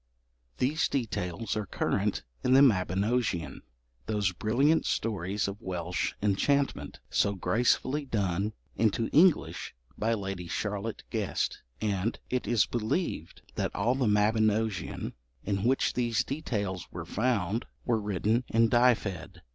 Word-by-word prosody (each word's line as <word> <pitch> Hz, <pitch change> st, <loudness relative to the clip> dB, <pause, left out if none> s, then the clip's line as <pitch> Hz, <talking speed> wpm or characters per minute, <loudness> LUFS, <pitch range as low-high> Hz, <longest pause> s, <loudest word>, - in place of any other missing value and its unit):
These 145 Hz, +5 st, +1 dB
details 110 Hz, -6 st, -2 dB
are 105 Hz, -2 st, -2 dB
current -, -, -1 dB, 0.2 s
in 130 Hz, -, +3 dB
the 135 Hz, -, +8 dB
Mabinogion, 100 Hz, -, +1 dB, 0.5 s
those 105 Hz, -3 st, +1 dB
brilliant 130 Hz, -, +2 dB
stories 100 Hz, -2 st, -1 dB
of 100 Hz, +1 st, -6 dB
Welsh 90 Hz, -1 st, -2 dB
enchantment, 135 Hz, +8 st, +1 dB
so 100 Hz, 0 st, +2 dB
gracefully 125 Hz, -, +1 dB
done 100 Hz, -3 st, -1 dB, 0.2 s
into 115 Hz, +1 st, +1 dB
English 165 Hz, -, +3 dB, 0.2 s
by 115 Hz, +1 st, +2 dB
Lady 95 Hz, -4 st, -5 dB
Charlotte 105 Hz, +4 st, -3 dB
Guest, -, -, -1 dB, 0.2 s
and 105 Hz, +1 st, 0 dB
it 125 Hz, 0 st, -1 dB
is 115 Hz, -4 st, +3 dB
believed 115 Hz, -, -2 dB
that -, -, -2 dB
all 110 Hz, +5 st, +2 dB
the 130 Hz, -2 st, 0 dB
Mabinogion 110 Hz, 0 st, +1 dB, 0.3 s
in 100 Hz, +1 st, -1 dB
which 130 Hz, +2 st, +2 dB
these 120 Hz, -3 st, +1 dB
details 105 Hz, -, -3 dB
were -, -, -6 dB
found 110 Hz, -2 st, 0 dB, 0.2 s
were 115 Hz, -3 st, +1 dB
written 105 Hz, +4 st, 0 dB
in 115 Hz, 0 st, +3 dB
Dyfed. 100 Hz, -8 st, +1 dB
110 Hz, 125 wpm, -29 LUFS, 95-120 Hz, 0.5 s, the